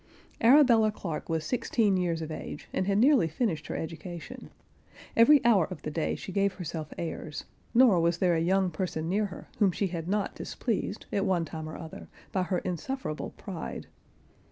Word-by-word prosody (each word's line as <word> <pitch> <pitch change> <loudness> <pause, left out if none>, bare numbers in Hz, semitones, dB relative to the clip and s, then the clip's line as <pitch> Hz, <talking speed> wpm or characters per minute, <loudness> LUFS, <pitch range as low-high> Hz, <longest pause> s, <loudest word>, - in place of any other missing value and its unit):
Arabella 235 -4 +6
Clarke 170 -7 -5
was 160 -1 -1
sixteen 225 -5 +1
years 170 -3 0
of 160 - -6
age, 150 - -7
and 185 - 0
had 200 0 +2
nearly 255 - +5
finished 165 - -2
her - - -4
education; 170 +1 -7 0.7
every 275 +4 +6
hour 205 -9 +5
of 185 - -8
the 150 - -3
day 160 +1 -1
she - - -7
gave 200 +1 +1
herself 165 -4 -6
airs, 160 -2 -5 0.3
nor 235 -7 +6
was 170 0 +2
there 180 -1 +3
a 165 - +1
young 185 +2 +2
person 160 -1 -3
near 205 +4 +1
her, 185 - -10
whom 200 -4 +4
she 200 - -1
had 165 -2 -5
not 205 +1 0
displeased, - - -3
at 200 - +1
one 185 -4 +1
time 160 -1 -6
or 155 - -7
other, 160 -2 -9 0.2
by 190 - 0
her 180 0 0
insufferable 185 - -3
pride. 185 -6 -6
185 Hz, 180 wpm, -29 LUFS, 165-210 Hz, 0.7 s, Arabella